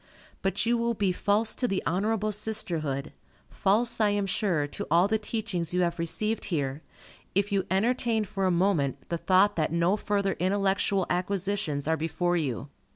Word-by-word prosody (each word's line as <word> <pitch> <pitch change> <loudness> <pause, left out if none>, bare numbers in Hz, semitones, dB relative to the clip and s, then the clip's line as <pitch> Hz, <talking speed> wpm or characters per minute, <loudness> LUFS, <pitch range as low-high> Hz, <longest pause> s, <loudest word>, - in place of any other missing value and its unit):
But 195 +3 0
you 235 +1 +2
will 235 0 0
be 200 -3 +1
false 210 +4 +1
to 250 - -1
the 195 -4 -1
honorable 215 +4 0
sisterhood, 165 -10 -2 0.4
false, 225 +4 +1
I 210 - +4
am 205 -1 0
sure, 185 -6 0
to 145 - -5
all 170 +4 +4
the 220 +1 +1
teachings 200 -6 -3
you 180 - +2
have 170 -1 0
received 215 +7 -1
here, 145 -4 -2 0.5
if 200 +1 +1
you 195 -1 0
entertain 225 +3 +1
for 195 0 -2
a - - +3
moment 170 -6 +1
the 170 - -2
thought 190 +4 +4
that 155 -1 +1
no 170 +4 +2
further 200 -2 0
intellectual 195 0 +1
acquisitions 180 -5 -1
are 160 0 +2
before 175 +2 0
you. 140 -5 -2
195 Hz, 170 wpm, -28 LUFS, 170-210 Hz, 0.5 s, I